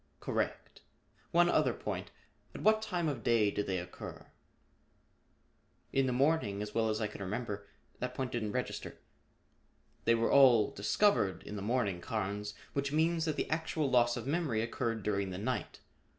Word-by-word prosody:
"Correct. -, -, -3 dB, 0.5 s
One 175 Hz, +1 st, +5 dB
other -, -, +2 dB
point. -, -, -4 dB, 0.5 s
At -, -, -6 dB
what 215 Hz, 0 st, +5 dB
time 180 Hz, -6 st, -1 dB
of 140 Hz, -6 st, -2 dB
day 110 Hz, -3 st, +3 dB
did 105 Hz, -, -2 dB
they 95 Hz, -1 st, 0 dB
occur?" 90 Hz, 0 st, -8 dB, 1.6 s
"In 135 Hz, -1 st, +3 dB
the -, -, +1 dB
morning, 125 Hz, -7 st, +1 dB
as 105 Hz, 0 st, -7 dB
well 115 Hz, -1 st, +2 dB
as 110 Hz, 0 st, 0 dB
I 110 Hz, -, 0 dB
can 105 Hz, -1 st, -7 dB
remember. 100 Hz, 0 st, -4 dB, 0.3 s
That 125 Hz, 0 st, -3 dB
point 130 Hz, -1 st, -2 dB
didn't 110 Hz, -4 st, -2 dB
register." -, -, -4 dB, 1.1 s
"They 115 Hz, -, +5 dB
were 115 Hz, 0 st, +1 dB
all 125 Hz, -6 st, +6 dB
discovered 105 Hz, -, +2 dB
in 105 Hz, -, -7 dB
the 100 Hz, -, -4 dB
morning, 100 Hz, -5 st, 0 dB
Carnes, 105 Hz, 0 st, -3 dB, 0.2 s
which 140 Hz, 0 st, -1 dB
means 160 Hz, +2 st, +2 dB
that 155 Hz, -2 st, 0 dB
the -, -, -1 dB
actual 155 Hz, -2 st, 0 dB
loss 120 Hz, -1 st, +4 dB
of 120 Hz, -, -5 dB
memory 140 Hz, -7 st, 0 dB
occurred 115 Hz, -1 st, -2 dB
during 100 Hz, -1 st, 0 dB
the 90 Hz, -, -5 dB
night. 125 Hz, +6 st, -3 dB
115 Hz, 165 wpm, -33 LUFS, 105-140 Hz, 1.6 s, all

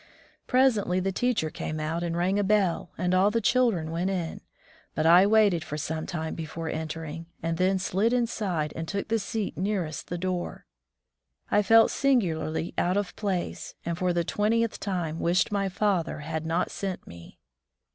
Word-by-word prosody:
Presently 225 Hz, -8 st, +3 dB
the 195 Hz, +1 st, 0 dB
teacher 215 Hz, -7 st, 0 dB
came 155 Hz, 0 st, -4 dB
out 160 Hz, +2 st, -2 dB
and 170 Hz, -1 st, -2 dB
rang 185 Hz, +3 st, +1 dB
a -, -, +2 dB
bell, 195 Hz, -3 st, +1 dB
and 180 Hz, 0 st, 0 dB
all 190 Hz, +2 st, +5 dB
the 230 Hz, +2 st, +1 dB
children 220 Hz, -8 st, +2 dB
went 175 Hz, +3 st, -1 dB
in, 175 Hz, -4 st, -3 dB, 0.5 s
but 155 Hz, -, 0 dB
I 175 Hz, +4 st, +7 dB
waited 205 Hz, -6 st, +4 dB
for 150 Hz, -, -5 dB
some 160 Hz, +1 st, -3 dB
time 160 Hz, -2 st, -3 dB
before 165 Hz, 0 st, -5 dB
entering, 160 Hz, +1 st, -5 dB, 0.2 s
and 165 Hz, 0 st, -1 dB
then 190 Hz, +1 st, +3 dB
slid 195 Hz, +4 st, +1 dB
inside 205 Hz, -10 st, -1 dB
and 165 Hz, 0 st, -4 dB
took 200 Hz, +3 st, -3 dB
the 225 Hz, 0 st, +2 dB
seat 210 Hz, +1 st, -3 dB
nearest 185 Hz, -5 st, -2 dB
the 175 Hz, -, -3 dB
door. 180 Hz, 0 st, -3 dB, 0.9 s
I 205 Hz, -, +5 dB
felt 225 Hz, +3 st, +6 dB
singularly 175 Hz, -11 st, 0 dB
out 180 Hz, +3 st, +1 dB
of 205 Hz, -2 st, -2 dB
place, 195 Hz, -4 st, -3 dB
and 170 Hz, -, -1 dB
for 180 Hz, +1 st, 0 dB
the 175 Hz, -1 st, +1 dB
twentieth 225 Hz, +5 st, 0 dB
time 175 Hz, -5 st, -2 dB
wished 175 Hz, +4 st, +2 dB
my 200 Hz, -1 st, 0 dB
father 185 Hz, -5 st, 0 dB
had 160 Hz, +1 st, -4 dB
not 165 Hz, +2 st, 0 dB
sent 195 Hz, -2 st, -4 dB
me. 85 Hz, 0 st, -13 dB
180 Hz, 175 wpm, -27 LUFS, 165-205 Hz, 0.9 s, I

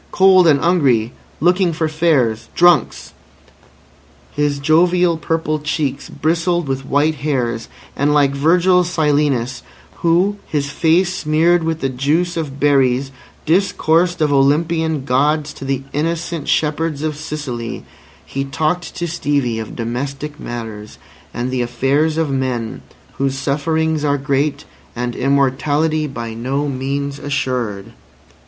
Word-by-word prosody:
Cold 185 Hz, -2 st, +5 dB
and 145 Hz, -3 st, +5 dB
'ungry. 135 Hz, -10 st, +2 dB, 0.3 s
Looking 180 Hz, +2 st, +2 dB
for 160 Hz, 0 st, -1 dB
fares. 155 Hz, -9 st, +1 dB
Drunks." 175 Hz, -1 st, +3 dB, 1.2 s
His 145 Hz, -1 st, 0 dB
jovial 170 Hz, +4 st, +3 dB
purple 160 Hz, -1 st, -1 dB
cheeks 145 Hz, -2 st, -2 dB
bristled 165 Hz, +2 st, 0 dB
with 135 Hz, 0 st, -3 dB
white 150 Hz, +3 st, +2 dB
hairs; 125 Hz, -6 st, -1 dB, 0.3 s
and 145 Hz, +1 st, +1 dB
like 145 Hz, -2 st, +3 dB
Virgil's 175 Hz, +5 st, +3 dB
Silenus, 145 Hz, -7 st, 0 dB, 0.4 s
who, 180 Hz, +5 st, +2 dB
his 140 Hz, -2 st, -2 dB
face 175 Hz, +4 st, +2 dB
smeared 165 Hz, +2 st, +2 dB
with 160 Hz, 0 st, -2 dB
the 135 Hz, -, +1 dB
juice 150 Hz, +7 st, 0 dB
of 145 Hz, -4 st, -4 dB
berries, 135 Hz, -2 st, +2 dB, 0.3 s
discoursed 175 Hz, -1 st, +2 dB
of 150 Hz, -2 st, +2 dB
Olympian 155 Hz, +1 st, +1 dB
Gods 145 Hz, +3 st, +1 dB
to 135 Hz, -, -9 dB
the 135 Hz, 0 st, -2 dB
innocent 165 Hz, +1 st, -2 dB
shepherds 155 Hz, -1 st, 0 dB
of 155 Hz, -1 st, -2 dB
Sicily, 145 Hz, -6 st, -5 dB, 0.4 s
he 135 Hz, -, -3 dB
talked 155 Hz, +5 st, -2 dB
to 175 Hz, -, -3 dB
Stevie 140 Hz, -8 st, -1 dB
of 110 Hz, -, -7 dB
domestic 135 Hz, +6 st, -4 dB
matters 110 Hz, -3 st, -7 dB, 0.3 s
and 125 Hz, +2 st, -3 dB
the 130 Hz, -1 st, -1 dB
affairs 135 Hz, +6 st, 0 dB
of 160 Hz, -3 st, 0 dB
men 125 Hz, -4 st, -2 dB, 0.4 s
whose 135 Hz, 0 st, 0 dB
sufferings 155 Hz, +2 st, 0 dB
are 145 Hz, -1 st, +2 dB
great 140 Hz, +1 st, -1 dB, 0.3 s
and 120 Hz, 0 st, -3 dB
immortality 145 Hz, +3 st, +1 dB
by 115 Hz, -4 st, -6 dB
no 135 Hz, +6 st, -2 dB
means 140 Hz, +1 st, -3 dB
assured. 125 Hz, -8 st, -3 dB
145 Hz, 125 wpm, -18 LUFS, 135-160 Hz, 1.2 s, Cold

